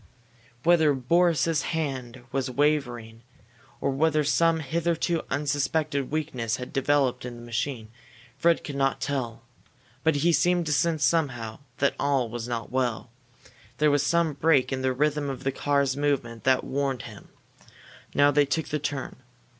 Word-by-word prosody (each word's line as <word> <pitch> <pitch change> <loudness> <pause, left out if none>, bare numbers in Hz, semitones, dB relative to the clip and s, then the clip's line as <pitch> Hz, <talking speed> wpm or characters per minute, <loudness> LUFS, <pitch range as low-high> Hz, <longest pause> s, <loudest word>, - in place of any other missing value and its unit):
Whether 160 -4 +4
Boris's 165 +3 +2
hand 130 -6 -4
was 135 -1 -1
wavering 125 -5 -1 0.6
or 140 - 0
whether 155 +2 +2
some 165 +2 +2
hitherto 165 +2 0
unsuspected 145 0 -1
weakness 130 -8 -2
had 125 +2 -8
developed 135 -2 +1
in 125 -1 -6
the 120 - -11
machine, 120 0 -3 0.5
Fred 170 +4 +2
could 145 - -6
not 135 0 +1
tell. 120 -5 -3 0.6
But 160 -2 +3
he 165 +4 +2
seemed 175 +1 +2
to 150 - 0
sense 160 +1 +1
somehow 120 -7 0 0.2
that 140 - +2
all 135 -4 +1
was 120 0 -5
not 115 -2 -4
well. 125 -2 -1 0.7
There 150 +1 +3
was 145 -1 +3
some 170 +1 +1
break 145 -2 +2
in 130 - -2
the 130 0 +1
rhythm 145 +2 0
of 135 - -6
the 135 - 0
car's 140 -1 +1
movement 135 -6 -1
that 130 -1 +3
warned 135 -3 -2
him. - - -11 0.9
Now 145 0 +5
they 145 0 +4
took 160 +3 -1
the 150 - -1
turn. 145 -2 -4
140 Hz, 155 wpm, -26 LUFS, 125-155 Hz, 0.9 s, Now